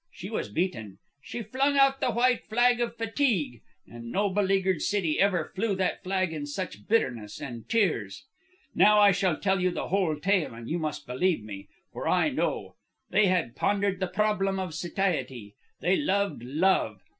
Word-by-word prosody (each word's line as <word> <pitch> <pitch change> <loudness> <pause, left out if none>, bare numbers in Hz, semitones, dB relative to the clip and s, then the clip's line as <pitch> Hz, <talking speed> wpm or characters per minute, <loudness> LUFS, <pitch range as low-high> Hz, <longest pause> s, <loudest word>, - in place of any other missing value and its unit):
She - - -9
was - - -3
beaten. 110 - -3 0.2
She 235 - -6
flung 270 +6 0
out 275 0 +4
the - - +2
white 245 +2 +2
flag 240 +2 +3
of 235 0 -2
fatigue. 225 - 0 0.2
And 115 0 -10
no 200 0 +1
beleaguered 190 -2 +1
city 185 -7 0
ever 185 -5 +1
flew 205 0 0
that 185 -1 -1
flag 185 -2 -1
in 145 -2 -5
such 185 +6 -6
bitterness 120 - 0
and 120 -4 -8
tears. 150 - 0 0.5
"Now 210 0 +5
I 205 -1 +7
shall 185 -4 +1
tell 195 -1 +1
you 185 - +2
the 175 - -4
whole 185 -4 +1
tale, 175 - 0
and 115 0 -9
you 170 - -2
must 155 -2 -4
believe 130 - 0
me, 100 -2 -9 0.3
for - - -5
I - - +3
know. - - -2 0.3
They 210 0 +4
had 180 -10 0
pondered 200 -2 0
the 185 - -1
problem 195 -1 0
of 185 -4 -4
satiety. 150 - -2 0.3
They 180 +3 +2
loved 200 - 0
Love. 130 - +1
185 Hz, 175 wpm, -27 LUFS, 145-205 Hz, 0.5 s, I